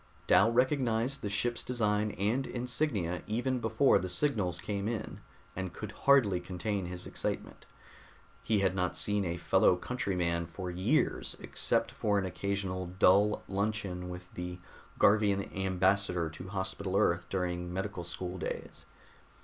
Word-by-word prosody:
Dal 100 Hz, +5 st, +5 dB
recognized 125 Hz, 0 st, +1 dB
the 105 Hz, -, -3 dB
ship's 120 Hz, +4 st, 0 dB
design 105 Hz, -3 st, 0 dB
and 115 Hz, +7 st, 0 dB
insignia 120 Hz, -, -1 dB
even 125 Hz, +4 st, 0 dB
before 115 Hz, +4 st, +4 dB
the 95 Hz, -, -4 dB
signals 100 Hz, -, 0 dB
came 100 Hz, +2 st, -3 dB
in, 110 Hz, -2 st, -4 dB, 0.3 s
and 95 Hz, -2 st, -4 dB
could 110 Hz, -1 st, -6 dB
hardly 110 Hz, -7 st, +4 dB
contain 90 Hz, +2 st, -3 dB
his 90 Hz, 0 st, -6 dB
excitement. -, -, -4 dB, 0.7 s
He 110 Hz, -3 st, +1 dB
had 95 Hz, -2 st, +2 dB
not 90 Hz, -2 st, -1 dB
seen 105 Hz, -1 st, +1 dB
a 85 Hz, -1 st, -2 dB
fellow 85 Hz, +1 st, +4 dB
countryman 90 Hz, -6 st, -1 dB
for 90 Hz, +2 st, -6 dB
years 90 Hz, +2 st, 0 dB
except -, -, 0 dB
for 105 Hz, -2 st, 0 dB
an 95 Hz, -, 0 dB
occasional 95 Hz, -1 st, -2 dB
dull 100 Hz, +3 st, +4 dB
luncheon 95 Hz, -3 st, -2 dB
with 90 Hz, 0 st, -9 dB
the 90 Hz, 0 st, -5 dB, 0.4 s
Garvian 100 Hz, -1 st, +3 dB
ambassador 95 Hz, -2 st, +1 dB
to 90 Hz, +3 st, -9 dB
Hospital 95 Hz, 0 st, -2 dB
Earth 85 Hz, -1 st, +2 dB
during 90 Hz, -2 st, -2 dB
medical 95 Hz, 0 st, -3 dB
school 90 Hz, +1 st, -5 dB
days. -, -, -6 dB
100 Hz, 140 wpm, -31 LUFS, 90-110 Hz, 0.7 s, Dal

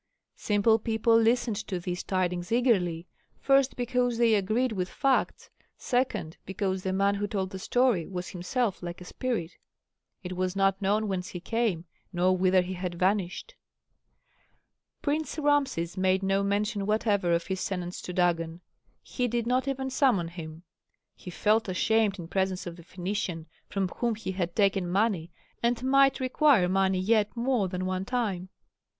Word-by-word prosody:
Simple 215 Hz, +2 st, +3 dB
people 225 Hz, +1 st, +2 dB
listened 230 Hz, -1 st, +2 dB
to 185 Hz, -3 st, -2 dB
these 175 Hz, 0 st, -4 dB
tidings 180 Hz, -1 st, -1 dB
eagerly, 190 Hz, -9 st, +2 dB, 0.3 s
first, 275 Hz, -1 st, +3 dB
because 245 Hz, -1 st, 0 dB
they 230 Hz, -1 st, +4 dB
agreed 215 Hz, +5 st, +1 dB
with 185 Hz, -3 st, -2 dB
facts, 270 Hz, -2 st, 0 dB, 0.3 s
second, 245 Hz, -10 st, -1 dB
because 190 Hz, 0 st, -2 dB
the 190 Hz, -, -2 dB
man 200 Hz, +1 st, +2 dB
who 205 Hz, +1 st, -2 dB
told 190 Hz, -2 st, -2 dB
the 190 Hz, -, -6 dB
story 245 Hz, -5 st, +1 dB
was 180 Hz, -2 st, -5 dB
himself 195 Hz, +4 st, -2 dB
like 175 Hz, -1 st, -6 dB
a 180 Hz, -, -10 dB
spirit 215 Hz, -7 st, -3 dB, 0.7 s
it 180 Hz, 0 st, -5 dB
was 185 Hz, +1 st, -1 dB
not 195 Hz, 0 st, +2 dB
known 210 Hz, +2 st, +1 dB
whence 185 Hz, -2 st, -2 dB
he 180 Hz, -, -6 dB
came 200 Hz, -3 st, -1 dB, 0.3 s
nor 185 Hz, 0 st, +2 dB
whither 185 Hz, 0 st, +3 dB
he 185 Hz, +1 st, -5 dB
had 180 Hz, -1 st, -4 dB
vanished. 190 Hz, -, -1 dB, 1.5 s
Prince 305 Hz, +2 st, -1 dB
Rameses 280 Hz, -, +1 dB
made 190 Hz, +1 st, +2 dB
no 195 Hz, +1 st, +2 dB
mention 205 Hz, +1 st, -1 dB
whatever 210 Hz, -4 st, +1 dB
of 170 Hz, 0 st, +1 dB
his 190 Hz, -1 st, -3 dB
tenants 180 Hz, -2 st, -4 dB
to -, -, -6 dB
Dagon; 170 Hz, -1 st, 0 dB, 0.4 s
he 250 Hz, -1 st, -2 dB
did 235 Hz, -1 st, -1 dB
not 255 Hz, +3 st, +1 dB
even 265 Hz, -1 st, -2 dB
summon 240 Hz, -, +2 dB
him. 165 Hz, -1 st, -9 dB, 0.5 s
He -, -, -11 dB
felt 215 Hz, +4 st, +1 dB
ashamed 210 Hz, +2 st, +2 dB
in 170 Hz, -3 st, -7 dB
presence 190 Hz, 0 st, -1 dB
of 175 Hz, -1 st, -6 dB
the 170 Hz, -, -13 dB
Phœnician 180 Hz, -2 st, -4 dB, 0.2 s
from 195 Hz, -2 st, -1 dB
whom 235 Hz, +5 st, -2 dB
he 210 Hz, -3 st, -5 dB
had 175 Hz, -2 st, -3 dB
taken 195 Hz, -3 st, +2 dB
money 190 Hz, -3 st, +1 dB, 0.3 s
and 235 Hz, +1 st, 0 dB
might 275 Hz, +1 st, +4 dB
require 260 Hz, -, +3 dB
money 190 Hz, 0 st, +2 dB
yet 215 Hz, +3 st, +1 dB
more 240 Hz, -4 st, +1 dB
than 180 Hz, 0 st, -3 dB
one 185 Hz, 0 st, -2 dB
time. 200 Hz, -7 st, -2 dB
195 Hz, 160 wpm, -28 LUFS, 180-235 Hz, 1.5 s, they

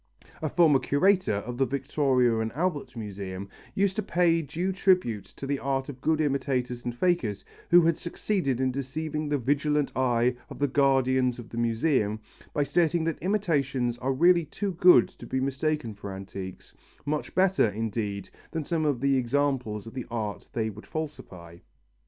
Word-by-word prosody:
A 155 Hz, -, -1 dB
former 155 Hz, -5 st, +4 dB
curator 185 Hz, -, +2 dB
of 120 Hz, +5 st, -5 dB
the 135 Hz, -, +4 dB
Victoria 130 Hz, -3 st, +1 dB
and 110 Hz, 0 st, -1 dB
Albert 155 Hz, -2 st, -2 dB
Museum 100 Hz, -3 st, -6 dB, 0.3 s
used 195 Hz, -1 st, +1 dB
to -, -, +2 dB
pay 170 Hz, -4 st, +2 dB
due 170 Hz, +5 st, -2 dB
tribute 180 Hz, -, +2 dB
to -, -, -9 dB
the 140 Hz, 0 st, -1 dB
art 135 Hz, 0 st, -1 dB
of 130 Hz, -2 st, -9 dB
good 160 Hz, -1 st, +1 dB
imitators 130 Hz, -4 st, -1 dB
and 120 Hz, -1 st, -4 dB
fakers, 130 Hz, -, 0 dB, 0.2 s
who 175 Hz, +1 st, +8 dB
had 165 Hz, -1 st, +2 dB
succeeded 170 Hz, -, -1 dB
in 130 Hz, 0 st, +1 dB
deceiving 150 Hz, +3 st, -3 dB
the 145 Hz, -, +1 dB
vigilant 145 Hz, +2 st, +1 dB
eye 125 Hz, -1 st, +2 dB
of -, -, -9 dB
the 145 Hz, -, +1 dB
guardians 130 Hz, -2 st, +2 dB
of 120 Hz, -1 st, -11 dB
museums, 115 Hz, -1 st, +1 dB, 0.3 s
by 145 Hz, -, +1 dB
stating 160 Hz, +3 st, +1 dB
that 165 Hz, 0 st, -2 dB
imitations 140 Hz, -, 0 dB
are 130 Hz, +2 st, 0 dB
really 170 Hz, +5 st, +4 dB
too 200 Hz, +6 st, -3 dB
good 175 Hz, -8 st, +6 dB
to 120 Hz, -, -13 dB
be 130 Hz, -, -1 dB
mistaken 140 Hz, -2 st, -1 dB
for 100 Hz, -1 st, -8 dB
antiques, 95 Hz, -1 st, -8 dB, 0.3 s
much 150 Hz, +1 st, -3 dB
better, 190 Hz, -, +3 dB
indeed, 105 Hz, -2 st, -3 dB, 0.2 s
than 160 Hz, -2 st, -3 dB
some 160 Hz, +1 st, -1 dB
of 140 Hz, -5 st, 0 dB
the 140 Hz, -1 st, +3 dB
examples 125 Hz, -4 st, 0 dB
of 115 Hz, -, -10 dB
the 130 Hz, -2 st, -5 dB
art 110 Hz, -3 st, -4 dB
they 110 Hz, -2 st, -1 dB
would 105 Hz, +2 st, -12 dB
falsify. 90 Hz, -, -7 dB
135 Hz, 170 wpm, -27 LUFS, 115-155 Hz, 0.3 s, who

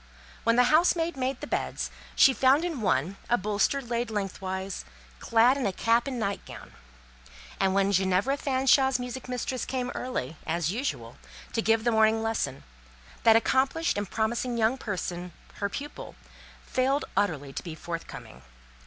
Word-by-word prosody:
When 230 Hz, 0 st, +3 dB
the 250 Hz, -, +6 dB
housemaid 335 Hz, +1 st, +3 dB
made 260 Hz, 0 st, -2 dB
the -, -, -4 dB
beds, -, -, -2 dB, 0.2 s
she 270 Hz, -, +6 dB
found 270 Hz, +6 st, +4 dB
in 325 Hz, -9 st, -3 dB
one, 175 Hz, +1 st, 0 dB
a 240 Hz, -, +4 dB
bolster 210 Hz, +7 st, 0 dB
laid 240 Hz, 0 st, -2 dB
lengthwise, 195 Hz, -2 st, -4 dB, 0.4 s
clad 235 Hz, +4 st, +4 dB
in 265 Hz, -, 0 dB
a -, -, 0 dB
cap 230 Hz, +6 st, +2 dB
and 265 Hz, -2 st, -3 dB
night 200 Hz, -2 st, -2 dB
gown; -, -, -11 dB, 0.9 s
and 190 Hz, -1 st, +2 dB
when 200 Hz, 0 st, +3 dB
Ginevra 190 Hz, +7 st, +2 dB
Fanshawe's 265 Hz, -1 st, +3 dB
music 250 Hz, 0 st, -6 dB
mistress 250 Hz, 0 st, -2 dB
came 250 Hz, -1 st, -2 dB
early, 165 Hz, -, -4 dB
as 170 Hz, 0 st, 0 dB
usual, 250 Hz, +7 st, -4 dB, 0.4 s
to 225 Hz, -, +1 dB
give 225 Hz, 0 st, +2 dB
the 240 Hz, -, +2 dB
morning 220 Hz, 0 st, +3 dB
lesson, 210 Hz, -12 st, -2 dB, 0.6 s
that 225 Hz, -1 st, +6 dB
accomplished 265 Hz, +7 st, +2 dB
and 205 Hz, -2 st, -3 dB
promising 235 Hz, +2 st, -1 dB
young 225 Hz, +2 st, +2 dB
person, 180 Hz, -7 st, -5 dB, 0.2 s
her 200 Hz, -, -1 dB
pupil, 290 Hz, +7 st, -7 dB, 0.5 s
failed 270 Hz, +3 st, +1 dB
utterly 145 Hz, -9 st, 0 dB
to -, -, -4 dB
be 165 Hz, -3 st, -7 dB
forthcoming. 165 Hz, -, -8 dB
225 Hz, 155 wpm, -27 LUFS, 195-260 Hz, 0.9 s, the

